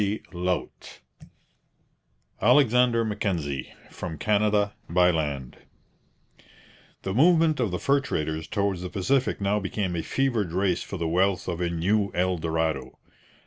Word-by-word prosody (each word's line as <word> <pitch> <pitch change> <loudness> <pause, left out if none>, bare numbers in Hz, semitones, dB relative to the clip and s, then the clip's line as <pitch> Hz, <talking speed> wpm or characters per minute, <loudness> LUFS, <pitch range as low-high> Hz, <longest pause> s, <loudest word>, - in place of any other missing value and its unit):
CHAPTER 105 +1 -3
V 90 -1 -1 1.7
'ALEXANDER 125 -4 +4
MACKENZIE, 85 -11 -2 0.2
FROM 80 -3 -6
CANADA, 105 0 +1 0.2
BY 90 +1 +4
LAND' 75 -6 -3 1.5
The 95 - -2
movement 160 - +4
of 115 -4 +1
the 90 - -2
fur 140 +9 +2
traders 80 - -3
towards 100 -3 -1
the 90 - -5
Pacific 125 +8 0
now 100 +1 +1
became 95 -2 -2
a 85 - -1
fevered 115 -7 -1
race 95 -1 +1
for 95 - -6
the 85 -1 -2
wealth 95 +3 +1
of 90 -1 -3
a 85 - 0
new 100 +5 +1
El 90 0 +1
Dorado. 80 -5 -2
95 Hz, 135 wpm, -26 LUFS, 85-105 Hz, 1.7 s, ALEXANDER